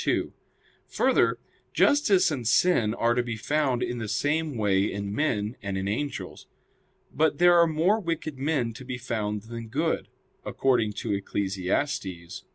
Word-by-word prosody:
2: - - 0 0.5
Further, - - +2 0.4
justice 235 - +4
and 125 -6 -3
sin 120 -5 +3
are 115 0 +2
to 125 - +1
be 120 -2 -4
found 135 +1 0
in 120 - -3
the 110 - -4
same 150 +4 -1
way 100 -1 +1
in 100 0 -4
men 110 -5 -1
and 100 -1 -3
in 95 +1 -2
angels. 140 +8 -4 0.7
But 155 -1 +2
there 175 0 +6
are 170 - +6
more 165 +7 +2
wicked 160 -6 -4
men 135 -5 0
to 125 - -10
be 125 -1 -5
found 105 -4 -3
than 115 0 -8
good; 155 +8 -1 0.4
according 120 -5 +1
to 105 - -3
Eccles. 95 0 -3
120 Hz, 155 wpm, -26 LUFS, 105-155 Hz, 0.7 s, there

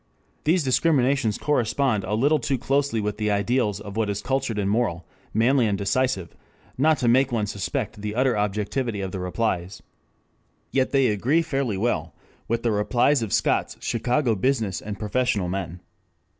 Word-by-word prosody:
These 165 +2 +3
discriminations 135 -4 +2
correspond 125 -5 +1
a 105 - -1
little 145 +7 +3
too 140 -1 -1
closely 135 -1 0
with 105 -1 -2
the 105 0 -1
ideals 105 +1 +1
of 100 -1 -9
what 110 -2 0
is 100 0 -3
cultured 130 -4 -1
and 100 -2 0
moral, 100 -6 0 0.3
manly 120 +2 +3
and 100 -2 0
decisive, 100 -2 -1 0.4
not 155 +3 +3
to 125 - -1
make 130 +3 +4
one 110 -3 0
suspect 100 +1 -4
the 105 0 -4
utter 130 0 +2
objectivity 105 +2 -1
of 95 -1 -4
the 95 - -4
replies. 90 -1 -2 0.9
Yet 130 -1 +1
they 135 -3 +3
agree 130 +11 +2
fairly 135 - -1
well 85 -8 -1 0.3
with 115 +1 -1
the 115 - +2
replies 120 +6 +2
of 110 -4 -3
Scott's - - +1
Chicago 120 +2 0
business 110 -3 0
and 105 -1 -6
professional 105 -3 0
men. 90 -2 -4
115 Hz, 165 wpm, -24 LUFS, 100-130 Hz, 0.9 s, make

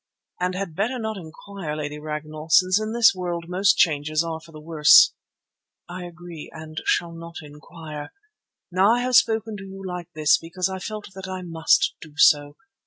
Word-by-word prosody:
"And 180 +1 -1
had 185 -4 -4
better 225 +8 -1
not 220 -2 -3
inquire, 170 -1 -7
Lady 150 -1 -5
Ragnall, 155 +1 -6
since 185 +4 +5
in 215 0 -3
this 230 -2 +5
world 175 -2 -4
most 190 +3 +2
changes 155 -1 +2
are 165 -1 -4
for 165 - -16
the 155 - -11
worse." 155 -1 +6 0.7
"I 180 +1 -7
agree, 175 -2 -10
and 155 0 -8
shall 170 -1 +1
not 165 0 -10
inquire. 150 0 -10 0.6
Now 195 +5 +4
I 245 - -1
have 250 0 0
spoken 220 -1 +3
to 195 - -9
you 195 0 -10
like 180 -1 -6
this 155 +7 +4
because 180 +3 -3
I 190 0 -5
felt 210 0 -7
that 190 0 -8
I 185 -1 -5
must 165 -2 +2
do 155 -2 -12
so. 145 -2 +4
175 Hz, 180 wpm, -23 LUFS, 155-190 Hz, 0.7 s, worse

